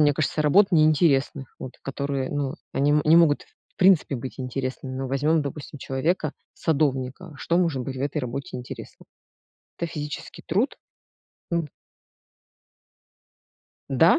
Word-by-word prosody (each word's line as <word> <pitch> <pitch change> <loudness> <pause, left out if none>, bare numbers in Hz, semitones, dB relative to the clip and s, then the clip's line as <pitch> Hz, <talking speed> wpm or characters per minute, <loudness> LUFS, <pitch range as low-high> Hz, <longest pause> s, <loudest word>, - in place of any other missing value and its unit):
мне 145 -1 +5
кажется, 155 +1 0
работ 185 +7 +5
неинтересных, 155 -5 +3
вот, 130 - -7
которые, 135 -1 -2
ну, 140 -2 -1 0.2
они 145 +2 +2
м 150 0 +4
не 155 +2 +6
могут, 165 -4 +5 0.3
в - - -41
принципе, 185 -7 +4
быть 130 +2 -7
интересными. 130 +1 -4
Но 135 0 -2
возьмем, 150 +4 +2
допустим, 145 0 -6
человека, 150 +4 -1 0.2
садовника, 145 +1 -1
что 170 +5 +1
может 165 -8 +1
быть 130 +1 -5
в - - -5
этой 145 +2 -1
работе 135 0 -4
интересно? 125 - -9 0.7
Это 170 - -2
физический 150 -2 -6
труд? 210 - +1 0.8
М. 170 -3 0 2.2
Да, 160 +6 +5
145 Hz, 135 wpm, -25 LUFS, 135-160 Hz, 2.2 s, не